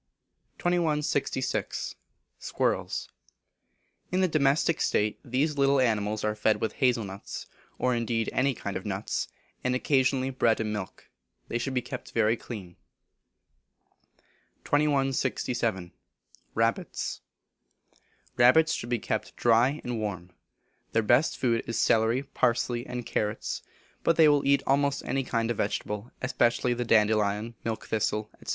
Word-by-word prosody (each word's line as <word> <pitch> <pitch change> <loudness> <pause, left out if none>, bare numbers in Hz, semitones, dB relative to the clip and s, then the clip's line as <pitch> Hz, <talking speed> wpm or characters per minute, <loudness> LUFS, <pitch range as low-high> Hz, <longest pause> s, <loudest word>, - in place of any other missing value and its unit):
2166. 150 -6 0 0.5
Squirrels. - - -1 1.0
In 185 +1 +2
a - - +4
domestic 155 0 +2
state 105 0 +1
these 140 +3 0
little 140 0 +4
animals 110 -3 +1
are 105 0 +1
fed 110 0 +1
with 110 - -1
hazel 125 -3 +3
nuts, 100 0 -7 0.3
or 125 - +1
indeed 115 -1 -1
any 135 0 +2
kind 100 -2 -5
of 95 - -3
nuts; 100 0 -2 0.4
and 125 0 +1
occasionally 130 0 +2
bread 115 -3 +2
and 110 -1 -1
milk. 105 -3 -6 0.4
They 120 - -1
should 130 +2 -3
be 125 - 0
kept 125 +1 -7
very 115 0 +3
clean. 100 -7 -9 1.9
2167. 135 -9 0 0.6
Rabbits. 115 +1 -1 1.2
Rabbits 130 +7 +6
should 120 - -4
be 120 - +1
kept - - -3
dry 120 +5 +3
and 120 -2 -3
warm. 95 -4 -4 0.6
Their 115 - +3
best 120 +8 +3
food 115 -3 +1
is 115 - -2
celery, 115 +4 +3
parsley, 120 -2 0
and 125 -1 -5
carrots; 105 0 -2 0.4
but 165 - +3
they 160 -1 +6
will 145 -2 +3
eat 140 0 +4
almost 140 +1 +1
any 135 0 0
kind 115 -2 -1
of 115 - -3
vegetable, 105 +2 -2
especially 125 -2 +2
the 120 0 -2
dandelion, 105 0 +2
milk 115 -1 -3
thistle, 105 0 -1
&c. - - -8
120 Hz, 130 wpm, -28 LUFS, 110-135 Hz, 1.9 s, Rabbits